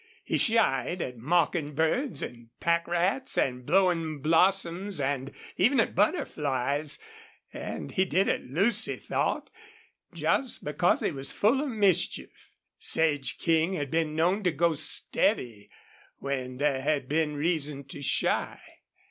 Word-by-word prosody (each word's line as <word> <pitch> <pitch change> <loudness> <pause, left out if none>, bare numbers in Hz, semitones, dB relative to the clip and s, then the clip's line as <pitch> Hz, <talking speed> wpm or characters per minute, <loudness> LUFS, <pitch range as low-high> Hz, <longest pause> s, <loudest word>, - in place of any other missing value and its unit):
He - - -1
shied 190 - +2
at 125 -7 -5
mockingbirds 160 - 0
and 120 -1 -8
pack 170 0 +1
rats 180 +10 0
and 125 -1 0
blowing 165 -3 +2
blossoms 180 +4 +2
and 135 -1 -2 0.3
even 270 +3 +3
at - - +1
butterflies; 145 - 0 0.6
and - - -6
he 190 - +2
did 190 +1 +1
it, - - 0
Lucy 205 - +2
thought, - - -2 0.6
just 265 -2 0
because 170 +4 +1
he - - 0
was 135 -1 -2
full 235 +7 +2
of 295 - -2
mischief. 205 -6 -1 0.3
Sage 145 -4 +2
King 165 +2 +1
had 145 -7 -3
been 160 -2 0
known 180 +6 +2
to 180 -3 +1
go 165 +2 +2
steady 120 -7 -1 0.5
when 130 -2 -4
there 140 -1 +1
had 140 -1 0
been 150 +1 0
reason 150 -2 -1
to 140 - -8
shy. 140 - 0
160 Hz, 130 wpm, -28 LUFS, 140-185 Hz, 0.6 s, even